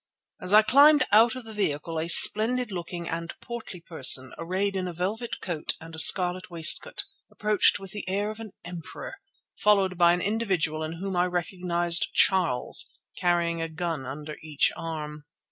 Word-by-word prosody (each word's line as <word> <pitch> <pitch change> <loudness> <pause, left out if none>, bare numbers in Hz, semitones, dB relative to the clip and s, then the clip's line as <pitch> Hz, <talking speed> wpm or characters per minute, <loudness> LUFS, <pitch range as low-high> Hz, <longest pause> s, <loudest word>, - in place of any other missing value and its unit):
As 180 - -2
I 215 +1 +7
climbed 290 +6 +5
out 230 +4 +4
of 255 - -8
the 220 - -9
vehicle 165 -5 -3
a 160 - -3
splendid 225 +7 +4
looking 175 -1 -6
and 165 0 -5
portly 235 -7 -9
person, 130 -6 +4
arrayed 190 +4 -2
in 185 -1 -2
a 175 - -6
velvet 205 +8 -4
coat 165 -5 -3
and 165 0 -12
a 160 - -6
scarlet 180 +2 +4
waistcoat, 165 -2 +2 0.3
approached 210 -1 +2
with 195 -2 -10
the 210 -3 -6
air 205 +2 -2
of 215 - -11
an 220 -4 -10
emperor, 175 - -9 0.4
followed 195 -3 +2
by 170 0 +5
an 175 - -2
individual 190 -7 -2
in 155 +1 -5
whom 190 +3 -5
I 180 +1 +1
recognized 175 -1 -2
Charles, 180 -10 +1 0.3
carrying 170 -2 0
a 165 - -4
gun 160 -4 -5
under 150 +3 -8
each 155 -2 0
arm. 150 -2 -7
180 Hz, 170 wpm, -25 LUFS, 165-205 Hz, 0.4 s, I